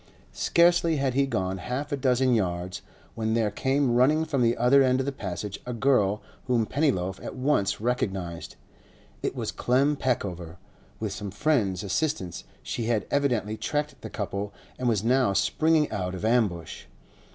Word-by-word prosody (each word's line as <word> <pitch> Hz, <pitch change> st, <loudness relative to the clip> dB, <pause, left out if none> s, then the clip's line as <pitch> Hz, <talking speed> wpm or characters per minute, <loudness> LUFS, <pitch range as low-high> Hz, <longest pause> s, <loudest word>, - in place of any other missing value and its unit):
Scarcely 170 Hz, -1 st, +3 dB
had 135 Hz, -3 st, 0 dB
he 135 Hz, +1 st, +2 dB
gone 95 Hz, -6 st, -2 dB
half 130 Hz, +8 st, -4 dB
a -, -, +1 dB
dozen 130 Hz, -1 st, +2 dB
yards, 90 Hz, -4 st, -1 dB, 0.3 s
when 110 Hz, 0 st, -1 dB
there 110 Hz, -3 st, +1 dB
came 135 Hz, +1 st, +1 dB
running 150 Hz, +6 st, +4 dB
from 145 Hz, -5 st, -1 dB
the 120 Hz, 0 st, +2 dB
other 130 Hz, +3 st, +5 dB
end 130 Hz, -1 st, +3 dB
of 135 Hz, -, 0 dB
the 140 Hz, -, -1 dB
Passage 100 Hz, -4 st, -5 dB
a 125 Hz, -, -5 dB
girl 105 Hz, -5 st, +2 dB, 0.2 s
whom 120 Hz, -3 st, +2 dB
Pennyloaf 100 Hz, -, 0 dB
at -, -, -6 dB
once 130 Hz, -6 st, +1 dB
recognised. 95 Hz, -8 st, -2 dB, 0.7 s
It -, -, -2 dB
was -, -, -3 dB
Clem 135 Hz, +4 st, +2 dB
Peckover; 90 Hz, -, -2 dB, 0.4 s
with -, -, -3 dB
some 105 Hz, -, -5 dB
friend's 100 Hz, -, 0 dB
assistance 95 Hz, -, -2 dB, 0.2 s
she 115 Hz, -, -3 dB
had 110 Hz, -3 st, 0 dB
evidently 120 Hz, -7 st, 0 dB
tracked 150 Hz, +4 st, -3 dB
the -, -, -7 dB
couple 100 Hz, +1 st, -4 dB, 0.3 s
and 125 Hz, -1 st, +1 dB
was 105 Hz, -3 st, +1 dB
now 125 Hz, -3 st, +3 dB
springing 155 Hz, +10 st, +2 dB
out 90 Hz, -1 st, -3 dB
of 90 Hz, -, -4 dB
ambush. 105 Hz, -8 st, 0 dB
120 Hz, 165 wpm, -26 LUFS, 100-135 Hz, 0.7 s, other